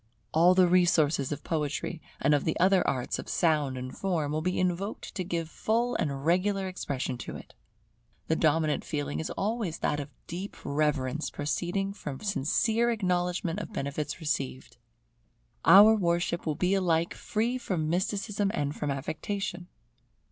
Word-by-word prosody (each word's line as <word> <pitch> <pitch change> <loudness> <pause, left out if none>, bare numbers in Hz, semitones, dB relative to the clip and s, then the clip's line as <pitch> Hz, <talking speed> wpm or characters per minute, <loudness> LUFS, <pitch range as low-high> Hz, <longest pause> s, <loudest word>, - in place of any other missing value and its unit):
All 175 +3 +5
the 185 -1 +6
resources 165 -6 +3
of 145 - -4
Poetry, 155 +1 -2 0.2
and 145 +2 +3
of 145 - +2
the 160 - -1
other 185 +1 +5
arts 125 -2 -1
of - - -7
sound 150 -6 +1
and 130 0 -6
form, 165 -7 -1
will 155 +1 -1
be 180 +2 -1
invoked 185 +3 -2
to 185 - -2
give 170 -2 -2
full 230 +8 0
and 140 -8 -2
regular 190 +3 +2
expression 135 -8 -3
to - - -6
it. - - -11 0.7
The 160 - +1
dominant 155 -1 +2
feeling 145 -2 -3
is 160 - -3
always 205 -5 -2
that 150 - 0
of 145 0 -5 0.2
deep 185 +4 -6
reverence 150 -1 0
proceeding 175 +6 -2
from 145 -9 -6
sincere 220 - +1
acknowledgment 180 -3 0
of 215 - -7
benefits 145 -2 -3
received. 135 -6 -3 0.9
Our 210 +3 +9
worship 170 -3 0
will 155 - 0
be 180 +4 +1
alike 170 -3 +1
free 235 +4 -1
from 180 -10 -2
mysticism 195 +4 0
and 145 0 -1
from 150 - -3
affectation. 175 +6 -3
170 Hz, 155 wpm, -29 LUFS, 150-195 Hz, 0.9 s, Our